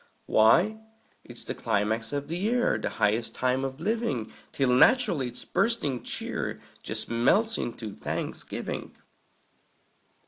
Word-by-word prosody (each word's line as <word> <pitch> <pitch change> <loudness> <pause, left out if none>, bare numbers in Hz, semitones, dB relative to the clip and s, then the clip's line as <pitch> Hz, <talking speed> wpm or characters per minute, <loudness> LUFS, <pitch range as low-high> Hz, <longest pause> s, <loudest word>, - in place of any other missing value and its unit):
Why, 170 - +4 0.4
it's 120 -1 -8
the - - -4
climax 110 +1 0
of 145 0 -3
the 165 - -3
year, 235 +7 +1
The - - -2
highest 110 +3 +1
time 130 +1 +1
of 135 +1 -4
living! 200 - -1 0.2
Till 135 -2 +1
naturally 185 - +4
its 120 - -7
bursting 190 - 0
cheer - - -2 0.2
Just - - -4
melts 200 - +2
into 110 -3 -5
Thanksgiving. - - -5
135 Hz, 125 wpm, -27 LUFS, -, 0.4 s, Why